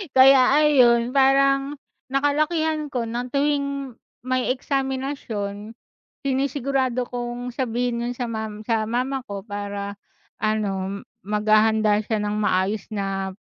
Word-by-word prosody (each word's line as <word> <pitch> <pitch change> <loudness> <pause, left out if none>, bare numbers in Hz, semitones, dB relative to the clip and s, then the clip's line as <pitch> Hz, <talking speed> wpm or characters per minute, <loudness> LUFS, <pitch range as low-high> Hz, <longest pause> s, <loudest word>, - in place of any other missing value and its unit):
Kaya 265 0 +7
ayon, 245 -5 +4
parang 275 +1 +3 0.3
nakalakihan 305 +3 0
ko 255 -4 -2
ng 240 +2 -3
tuwing 280 -3 -1 0.3
may 255 0 0
eksaminasyon 260 -6 -3 0.5
sinisigurado 265 -2 0
kong 245 0 -5
sabihin 240 -1 -1
yun 240 +1 -2
sa 245 0 -3
ma 220 -1 -3 0.2
sa 225 -2 +1
mama 255 +3 -1
ko 200 -1 -6
para 200 -1 -5 0.4
ano 200 -2 -1 0.2
maghahanda 215 +1 +3
siya 220 0 -1
ng 210 0 -1
maayos 200 0 +1
na 195 -2 -2
245 Hz, 110 wpm, -23 LUFS, 215-270 Hz, 0.5 s, Kaya